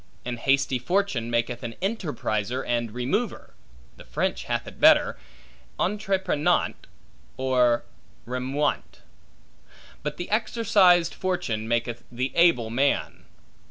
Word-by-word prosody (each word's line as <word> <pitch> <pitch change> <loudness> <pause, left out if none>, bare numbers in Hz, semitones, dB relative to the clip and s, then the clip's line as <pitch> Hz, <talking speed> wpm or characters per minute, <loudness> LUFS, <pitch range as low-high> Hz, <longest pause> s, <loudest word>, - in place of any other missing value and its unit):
An 120 -1 -3
hasty 135 0 +1
fortune 155 - 0
maketh 120 +1 -1
an 115 -1 -6
enterpriser 130 - -2
and 120 -1 -1
remover 130 - -2 0.4
(the - - -12
French - - -2
hath - - -2
it - - -11
better, - - +5 0.6
entreprenant, 190 -6 0 0.5
or 125 -2 +2 0.4
remuant); 130 +4 -2 1.0
but 150 0 -4
the 175 - -6
exercised 200 -6 +3
fortune 115 - -2
maketh 120 0 -1
the 130 +2 -2
able 145 -10 +4
man. 135 +4 0
130 Hz, 105 wpm, -25 LUFS, 120-175 Hz, 1.0 s, better